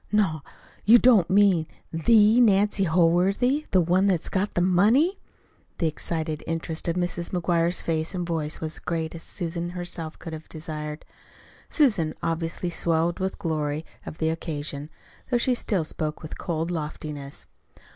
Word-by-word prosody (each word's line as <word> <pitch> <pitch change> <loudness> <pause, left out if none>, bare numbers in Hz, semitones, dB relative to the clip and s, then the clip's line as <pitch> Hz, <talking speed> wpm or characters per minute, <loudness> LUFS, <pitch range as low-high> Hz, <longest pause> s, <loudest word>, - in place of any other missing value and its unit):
"Not 190 -8 +2 0.4
you 225 +4 +8
don't 230 -8 +5
mean 190 -5 +4 0.3
THE 215 +7 +5
Nancy 205 -2 +3
Holworthy 185 - +2
the 185 - +4
one 180 +4 +3
that's 180 -5 0
got 200 +2 -1
the 175 - +2
money!" 220 - +3 0.6
The 170 - 0
excited 155 0 -3
interest 165 0 -3
in 170 - 0
Mrs. 175 -1 -2
McGuire's 170 -1 +1
face 160 +2 -2
and 180 -1 -2
voice 160 -3 -2
was 160 -1 -4
as - - -10
great 165 -2 -3
as 165 - -8
even - - -10 0.2
Susan 170 0 -3
herself 175 -2 -4
could 165 - -8
have 160 0 -9
desired. 155 -1 -6 0.6
Susan 210 - +2
obviously 165 +1 -2
swelled 170 0 0
with 190 0 -1
the - - -14
glory 155 -3 -2 0.2
of - - -8
the 160 - 0
occasion, 150 -2 -5 0.4
though 245 - +3
she 250 +2 +2
still 205 -7 0
spoke 155 0 -4
with 155 - -7
cold 165 0 -3
loftiness. 150 -3 -5
170 Hz, 160 wpm, -25 LUFS, 160-190 Hz, 0.6 s, you